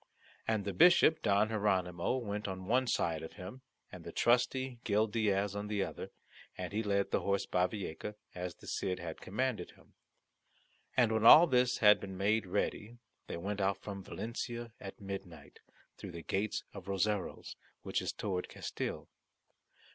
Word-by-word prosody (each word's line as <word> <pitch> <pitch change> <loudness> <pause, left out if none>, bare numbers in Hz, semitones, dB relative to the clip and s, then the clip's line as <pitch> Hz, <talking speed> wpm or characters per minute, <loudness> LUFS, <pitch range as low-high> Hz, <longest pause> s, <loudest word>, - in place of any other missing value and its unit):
And 110 -3 0
the 100 - -2
Bishop 165 -2 +6
Don 100 +2 +3
Hieronymo 95 -1 0
went 105 -3 -3
on 95 -1 -5
one 125 +5 +2
side 80 -8 0
of 80 - -8
him, 100 +7 -9 0.3
and - - -10
the - - -7
trusty 125 +1 +1
Gil 105 +1 +2
Diaz 105 -3 0
on 100 0 -3
the 105 -2 0
other, - - -6 0.5
and 90 +1 -5
he 110 - +1
led 100 -2 0
the - - +2
horse 100 0 0
Bavieca, 90 +1 -2 0.2
as 90 -1 -5
the - - -16
Cid 90 -1 -2
had 85 -3 -7
commanded 110 -2 -2
him. - - -23 1.0
And 120 -3 +4
when 110 -1 +1
all 155 +8 +10
this 125 -4 +2
had 105 -1 +6
been 95 -2 -7
made 105 +1 +1
ready, 105 +4 -2 0.3
they - - -4
went 100 +4 -3
out 95 -1 +1
from 100 -2 -6
Valencia 115 +2 -5
at 95 - -9
midnight, 95 -4 -8 0.4
through 95 - -8
the 85 -1 -7
gate 105 +4 -1
of 100 -2 -9
Roseros, 100 0 -1 0.3
which - - -1
is - - -2
towards 95 -4 -3
Castille. - - -5
100 Hz, 165 wpm, -33 LUFS, 95-110 Hz, 1.0 s, all